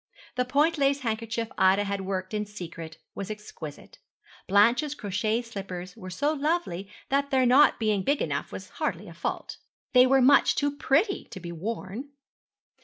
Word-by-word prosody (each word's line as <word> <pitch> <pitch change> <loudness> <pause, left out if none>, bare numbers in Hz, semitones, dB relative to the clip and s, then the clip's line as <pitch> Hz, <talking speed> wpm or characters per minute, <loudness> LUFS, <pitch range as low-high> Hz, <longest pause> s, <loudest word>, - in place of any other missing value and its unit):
The 250 0 0
point 295 +5 +2
lace 280 0 +2
handkerchief 230 -1 -2
Ida 190 +2 +5
had 200 -1 -2
worked 190 0 -3
in 210 -1 -2
secret 165 -5 -8 0.2
was 200 0 -6
exquisite. 210 -8 -9 0.5
Blanche's 235 +9 +4
crochet 215 +1 -1
slippers 190 -5 -7
were 185 -5 -9
so 285 +12 0
lovely 295 - -1 0.2
that 280 +1 +1
their 260 -2 +3
not 265 +4 +5
being 215 -3 +1
big 280 +8 +1
enough - - -2
was - - -8
hardly - - -2
a - - -10
fault. - - -4 0.4
They 250 0 +7
were 270 +1 +5
much 270 +2 +5
too 285 0 0
pretty 335 +9 +1
to 190 - -9
be 170 -1 -7
worn. 205 - -5
225 Hz, 165 wpm, -27 LUFS, 195-275 Hz, 0.5 s, They